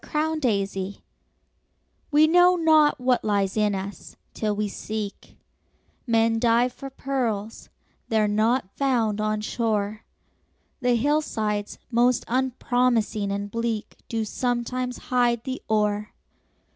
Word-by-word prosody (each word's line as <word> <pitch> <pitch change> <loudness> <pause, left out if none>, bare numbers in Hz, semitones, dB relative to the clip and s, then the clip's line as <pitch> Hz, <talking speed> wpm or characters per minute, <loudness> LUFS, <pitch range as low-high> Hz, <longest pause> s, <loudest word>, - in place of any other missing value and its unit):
HIDDEN 315 +1 -1
GEMS 200 -5 -1 1.1
We 300 +1 +5
know 355 +3 +5
not 315 -4 +4
what 250 0 +1
lies 200 -2 0
in 210 -2 +2
us, 195 +1 -7 0.2
till 210 -2 -1
we 210 0 -1
seek; 210 0 -6 0.7
Men 225 -1 +3
dive 240 +1 +3
for 275 +2 -8
pearls—they 230 -4 -4
are 210 - +3
not 215 0 +1
found 230 -6 +1
on 215 0 0
shore, 215 -1 -1 0.8
The 245 -1 +2
hillsides 220 -6 -1
most 245 +1 +3
unpromising 245 -4 0
and 200 0 -3
bleak 230 -2 -3
Do 225 -1 -1
sometimes 250 +2 -2 0.2
hide 240 -2 +2
the 260 -1 -4
ore. 210 -1 0
230 Hz, 115 wpm, -25 LUFS, 210-255 Hz, 1.1 s, We